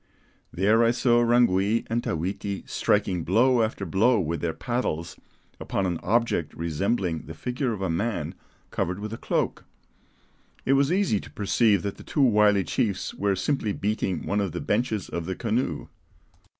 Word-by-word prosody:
There 105 +6 +3
I 115 - +4
saw 120 0 +3
Rangui 115 -3 +3
and 115 +1 -1
Tawiti 95 +2 -3
striking 95 -5 +1
blow 120 +8 +3
after 110 -3 -1
blow 110 +7 +3
with 85 -2 -2
their 85 - 0
paddles 85 -6 -2 0.4
upon 95 - -2
an 85 -3 -1
object 110 -7 0
resembling 85 +1 -1
the 80 - -8
figure 125 - -2
of 100 -4 -4
a 95 - -1
man 100 +3 -2 0.4
covered 90 +1 -1
with 105 +1 -5
a - - -5
cloak. - - -1 1.0
It 135 - +3
was 140 +2 +3
easy 185 - +2
to - - -11
perceive 105 -1 +2
that 100 - -4
the - - -11
two 145 - 0
wily 105 -5 +4
chiefs 95 +3 -1
were 100 -1 0
simply 105 +1 -1
beating 100 -5 -2
one 100 +1 0
of 95 -5 -2
the - - -3
benches 110 -5 -1
of 85 -1 -5
the 95 - -2
canoe. 110 - -2
105 Hz, 165 wpm, -26 LUFS, 90-120 Hz, 1.0 s, I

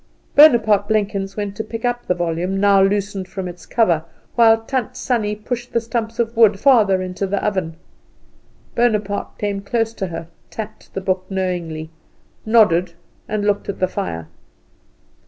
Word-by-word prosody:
Bonaparte 220 -9 +6
Blenkins 200 -2 -1
went 205 -1 -3
to 220 - -3
pick 225 +2 -6
up 245 0 -2
the 180 - +1
volume, 175 +2 -1
now 200 -1 +5
loosened 195 -1 0
from 190 -1 -5
its 175 0 -10
cover, 175 -9 +2 0.3
while 225 -2 +5
Tant 255 0 -3
Sannie 215 -4 -1
pushed 240 +3 -5
the 235 - +3
stumps 230 0 -3
of 235 0 -1
wood 215 -4 +5
further 210 -9 +4
into 185 +2 -3
the 200 +1 -1
oven. 190 -6 -1 1.0
Bonaparte 210 -4 0
came 200 -1 -2
close 225 +2 -1
to 195 -3 -3
her, 165 -1 -6 0.2
tapped 220 -1 -8
the 195 - -2
book 185 -1 -1
knowingly, 175 -4 -3 0.6
nodded, 185 -6 +4 0.3
and 210 -1 -2
looked 205 0 0
at 200 - -3
the 185 - +1
fire. 85 - -4
205 Hz, 155 wpm, -20 LUFS, 185-225 Hz, 1.0 s, Bonaparte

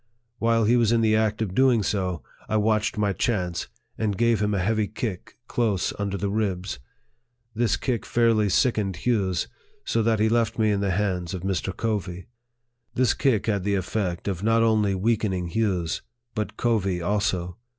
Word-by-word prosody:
While 115 0 +2
he 115 +3 +4
was 115 -2 +3
in 115 -1 +3
the 110 -1 +3
act 110 0 +1
of 95 -4 -4
doing 125 -2 +4
so, 95 -4 -1 0.3
I 110 - +2
watched 110 0 +1
my 105 -1 +1
chance, 90 -6 -1 0.3
and 105 -3 0
gave 115 -2 +2
him 105 0 +1
a - - 0
heavy 110 +2 +1
kick 105 -2 -5
close 110 -7 0
under 100 -1 -2
the 100 +1 -2
ribs. 95 -7 -2 0.7
This 115 0 +1
kick 125 -5 -2
fairly 115 -3 +2
sickened 105 -4 +1
Hughes, 95 -8 0 0.4
so 115 - +1
that 110 -1 +2
he 110 - +3
left 115 -1 +1
me 110 -2 +3
in 100 - +1
the 100 -1 0
hands 95 -2 -1
of 90 - -6
Mr. 95 -1 -2
Covey. 95 -5 -2 0.7
This 130 -1 +3
kick 125 -8 +1
had 100 -4 0
the 100 +1 +1
effect 95 -1 -2
of 95 -3 -2
not 115 +2 +3
only 105 -3 +2
weakening 95 -3 0
Hughes, 90 -5 -1 0.3
but 105 -1 -4
Covey 100 -6 +1
also. 90 -2 -1
105 Hz, 175 wpm, -25 LUFS, 95-115 Hz, 0.7 s, he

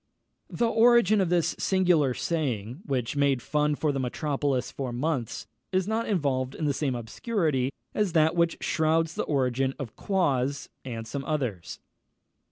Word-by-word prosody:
The 240 - 0
origin 230 -3 +5
of 185 - +1
this 175 -2 +1
singular 175 -9 +2
saying, 130 - -2
which 130 -2 -1
made 140 -2 +2
fun 150 +2 0
for 150 0 0
the 135 - -2
metropolis 135 0 -1
for 130 -3 -4
months, 125 -1 -2 0.3
is 185 0 +1
not 225 +2 -1
involved 135 -9 0
in 155 - -3
the 145 - +2
same 135 -3 -1
obscurity 135 - -1 0.2
as 205 -5 0
that 160 0 +4
which 170 -1 +2
shrouds 160 0 +1
the - - -2
origin 135 -2 0
of 130 -7 -7
Quoz 140 -8 0
and 115 -3 -6
some 135 +4 -4
others. 125 - -3
145 Hz, 155 wpm, -27 LUFS, 130-170 Hz, 0.3 s, origin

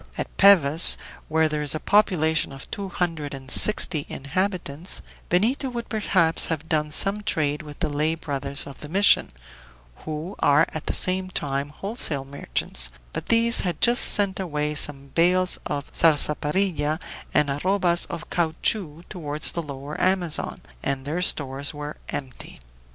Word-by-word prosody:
At - - -5
Pevas, 170 -6 +6 0.3
where 160 0 +2
there 150 -1 -3
is 150 +1 +2
a - - -3
population 160 -8 +1
of 135 0 -10
two 200 -1 -5
hundred 165 -6 -3
and 135 0 -10
sixty 170 -8 +1
inhabitants, 175 +2 -3 0.3
Benito 235 +10 +1
would 240 -1 -6
perhaps 185 -6 +2
have 160 -1 -4
done 150 -2 0
some 195 +7 +3
trade 150 -7 -1
with 150 0 -12
the 165 - +1
lay 150 +2 -1
brothers 140 -3 -2
of 140 - -11
the 150 - -10
mission, 200 +5 +4 0.7
who 155 +5 -7
are 145 +3 +4
at 155 - -6
the - - 0
same 185 0 +3
time 140 -4 -3
wholesale 155 - -2
merchants, 135 - -1 0.2
but - - -6
these 230 +1 +4
had 175 -4 -3
just 240 +1 +4
sent 200 -2 +2
away 150 -5 -2
some 140 -2 -2
bales 180 +2 +2
of 140 0 -4
sarsaparilla 155 +1 +2 0.3
and 150 -2 +1
arrobas 175 +3 +1
of 170 -2 -7
caoutchouc 165 0 0
toward 150 -3 -6
the 170 - +4
Lower 140 -1 -7
Amazon, 185 -4 0 0.2
and 135 -1 -3
their 160 +5 -3
stores 140 -3 +1
were 150 0 -7
empty. 130 -3 -7
155 Hz, 150 wpm, -23 LUFS, 145-185 Hz, 0.7 s, Pevas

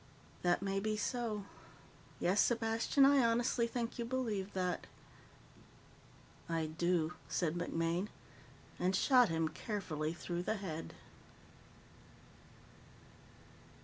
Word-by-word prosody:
"That 175 +1 +2
may 195 0 0
be 215 +1 -1
so. 220 -3 -2 0.7
Yes, 190 +3 +3
Sepastian, 230 +3 +3
I 275 -1 +6
honestly 235 +1 +2
think 235 0 -3
you - - 0
believe 230 -6 -2
that." 180 -2 -1 1.6
"I 165 -1 0
do," 170 +1 0 0.2
said 165 -4 0
MacMaine, 170 +2 -1 0.7
and 185 +2 +2
shot 250 +2 +5
him 165 0 +1
carefully 155 -4 -3
through 175 0 -4
the 220 - -1
head. 165 -6 -5
195 Hz, 100 wpm, -35 LUFS, 170-230 Hz, 1.6 s, I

